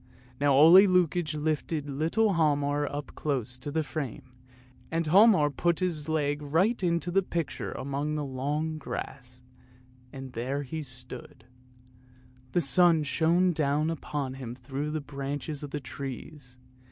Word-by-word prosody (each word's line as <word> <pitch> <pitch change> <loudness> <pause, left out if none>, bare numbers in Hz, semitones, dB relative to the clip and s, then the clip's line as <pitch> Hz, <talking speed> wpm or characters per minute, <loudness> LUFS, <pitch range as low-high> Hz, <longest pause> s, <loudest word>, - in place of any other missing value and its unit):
Now 140 -1 +3
Ole 170 +8 +8
Lukoie 175 -3 +1
lifted 150 0 -2
little 165 +10 +1
Hialmar 145 -3 +1
up 145 0 -6
close 130 -5 -2
to 140 - -5
the 160 +2 0
frame, 135 -2 -6 0.6
and 165 0 -1
Hialmar 180 -3 +5
put 170 +4 +1
his 165 -5 -2
leg 145 -2 0
right 175 +11 +1
into 170 -1 0
the 195 +2 +3
picture 170 -5 -4
among 140 +3 -3
the 150 -1 -2
long 145 +4 -2
grass, 125 -3 -7 0.7
and 135 -2 -9
there 135 +5 -2
he 155 +4 -5
stood; 125 +3 -8 1.1
the 175 - +3
sun 165 +3 +5
shone 170 +6 +2
down 150 +1 +1
upon 145 -4 -4
him 125 -3 -7
through 135 +3 -5
the 155 0 -3
branches 140 +1 -5
of 145 - -6
the 150 - -4
trees. 135 0 -8
150 Hz, 140 wpm, -28 LUFS, 140-165 Hz, 1.1 s, Ole